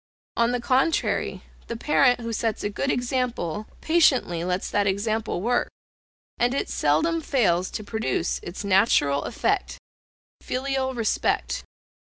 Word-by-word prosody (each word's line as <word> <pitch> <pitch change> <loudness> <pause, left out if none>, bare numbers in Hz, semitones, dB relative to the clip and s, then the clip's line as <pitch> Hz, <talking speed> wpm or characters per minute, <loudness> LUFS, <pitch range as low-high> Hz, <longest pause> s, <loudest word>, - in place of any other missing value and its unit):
On 235 0 +3
the 245 - 0
contrary, 265 +6 +1 0.2
the 235 - -4
parent 255 -2 +3
who 230 0 -4
sets 225 0 -1
a 205 - -1
good 275 +6 -2
example, 245 - -1
patiently 265 - +3
lets 180 +1 -1
that 205 0 +2
example 215 0 -1
work; 245 +2 +1 0.7
and 245 +2 +2
it - - -2
seldom 330 0 +1
fails 185 - +1
to 215 - -5
produce 215 -5 -1
its 175 +4 -7
natural 190 -8 +3
effect 380 - -1 0.6
filial 265 0 -2
respect. 230 -2 0
235 Hz, 130 wpm, -25 LUFS, 200-260 Hz, 0.7 s, On